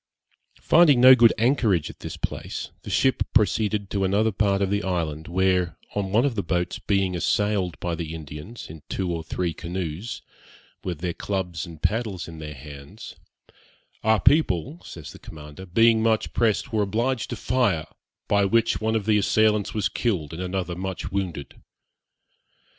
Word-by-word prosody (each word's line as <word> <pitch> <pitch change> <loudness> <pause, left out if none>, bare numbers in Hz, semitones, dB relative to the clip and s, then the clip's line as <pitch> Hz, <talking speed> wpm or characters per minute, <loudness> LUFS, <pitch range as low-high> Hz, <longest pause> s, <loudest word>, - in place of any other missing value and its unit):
Finding 155 -6 +6
no 130 +1 +10
good 120 -3 +6
anchorage 115 - +2
at - - -21
this - - -7
place, - - -5
the - - -9
ship 130 -1 +2
proceeded 105 -2 +2
to 100 -1 0
another 105 +4 +2
part 100 -1 +1
of 100 -1 0
the 100 0 +1
island, 80 -4 -2
where, 90 -2 +1 0.2
on 100 -2 -2
one 115 +6 +3
of 140 - +1
the 105 - -1
boats 90 0 -2
being 95 -2 0
assailed 100 0 0
by 85 - -2
the 80 -1 -4
Indians 75 - -9
in 80 0 -11
two 90 -2 -2
or 80 -1 -4
three 85 +1 -2
canoes, 90 +5 -5 0.6
with 85 -4 -4
their 90 -1 -2
clubs 90 -6 -3
and 80 -3 -12
paddles 110 -5 -1
in 80 -1 -9
their 75 -1 -7
hands, 70 +1 -11 0.9
'Our 110 0 +4
people,' 140 - +2
says 80 -4 -9
the - - -13
commander, 75 +4 -11
'being 115 +4 +4
much 110 -1 +1
pressed, 115 +1 +1
were 110 - +2
obliged 115 +3 -1
to - - -3
fire, 110 -11 +1 0.4
by 100 -1 +3
which 115 +4 +2
one 110 +1 0
of 110 -3 -1
the 105 -1 +3
assailants 105 0 +2
was 105 -3 +1
killed, 90 -10 -2
and 85 - -5
another 90 -1 -3
much 95 0 -5
wounded.' 95 -7 -4
95 Hz, 170 wpm, -24 LUFS, 85-110 Hz, 0.9 s, no